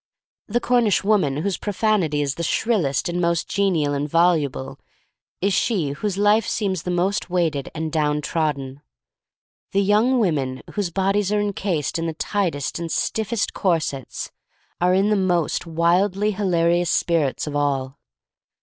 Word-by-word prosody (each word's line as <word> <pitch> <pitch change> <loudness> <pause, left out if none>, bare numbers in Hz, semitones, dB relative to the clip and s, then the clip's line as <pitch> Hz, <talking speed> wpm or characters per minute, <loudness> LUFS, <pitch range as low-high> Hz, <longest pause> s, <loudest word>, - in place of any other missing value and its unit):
The 235 +3 0
Cornish 240 -5 +2
woman 195 -10 +2
whose 200 -1 -1
profanity 195 -8 0
is 140 -1 -1
the 170 - -6
shrillest 170 - 0
and 175 0 -2
most 170 -1 0
genial 175 -8 +1
and 145 +1 -2
voluble, 160 -5 +1 0.6
is 195 +1 +1
she 185 - +1
whose 190 +7 -3
life 205 0 +3
seems 190 -5 -1
the 180 - -5
most 180 +2 0
weighted 165 -6 0
and 160 0 -3
down 150 -1 +1
trodden. 145 -4 -2 0.9
The 200 +1 +3
young 215 +6 +3
women 140 - 0
whose 205 -4 -2
bodies 195 +2 0
are 210 - +2
encased 195 -7 -1
in 165 - -2
the 165 - -2
tightest 170 -7 -2
and 165 -1 -4
stiffest 220 0 -1
corsets 155 - -2 0.5
are 180 +1 +3
in 200 +3 +2
the - - +4
most 175 -4 0
wildly 180 +5 +2
hilarious 175 -3 +1
spirits 165 -7 +1
of 150 -1 -5
all. 140 -2 -1
175 Hz, 150 wpm, -22 LUFS, 150-200 Hz, 0.9 s, the